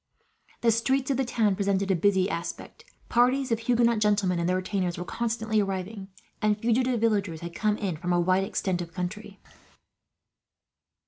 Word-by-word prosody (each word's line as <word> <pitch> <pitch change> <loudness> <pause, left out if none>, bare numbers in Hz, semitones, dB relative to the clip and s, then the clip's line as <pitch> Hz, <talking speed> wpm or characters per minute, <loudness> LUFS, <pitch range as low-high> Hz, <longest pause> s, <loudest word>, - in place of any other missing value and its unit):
The 230 - +4
streets 260 +4 +1
of 265 - 0
the 270 - +1
town 220 -4 +1
presented 200 0 0
a - - +3
busy 190 +1 +2
aspect. 170 - -6 0.2
Parties 255 +2 +2
of 225 - +1
Huguenot 235 -1 +2
gentlemen 205 -4 +2
and 170 +1 0
their 185 - +2
retainers 185 -1 -2
were 175 - -5
constantly 220 -1 -1
arriving, 195 +1 -4 0.3
and 210 0 +2
fugitive 240 +2 +1
villagers 205 -7 0
had 170 0 -6
come 210 +2 0
in 190 -7 -3
from 175 +3 -3
a 175 - +3
wide 185 +2 +2
extent 185 -2 -2
of 170 -1 -8
country. 200 +3 -5
205 Hz, 170 wpm, -27 LUFS, 185-230 Hz, 0.3 s, The